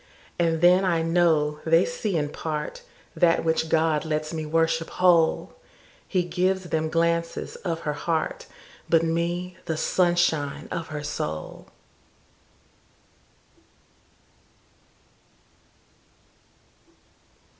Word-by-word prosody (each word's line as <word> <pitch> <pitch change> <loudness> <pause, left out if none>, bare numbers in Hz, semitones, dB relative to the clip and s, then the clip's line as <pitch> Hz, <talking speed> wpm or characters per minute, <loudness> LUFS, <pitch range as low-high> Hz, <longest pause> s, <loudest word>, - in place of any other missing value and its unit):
And 165 -2 +1
then 180 +2 +6
I 170 -3 +1
know 160 -3 +2
they 165 +2 +4
see 215 -7 -2
in 145 -1 -1
partThat 160 +2 -2
which 160 0 0
God 160 -2 +2
lets 155 0 -2
me 155 -1 -4
worship 165 +1 +1
whole:He 180 +1 0
gives 185 +1 -1
them 160 0 0
glances 170 +1 -1
of 165 -3 -4
her 150 - -2
heart, 160 +2 -2 0.4
But 165 -1 +4
me, 170 +2 -2
the 160 - -2
sunshine 175 -5 +1
of 165 -1 -4
her 150 -1 -6
soul. 80 - -5
165 Hz, 90 wpm, -25 LUFS, 155-175 Hz, 0.4 s, then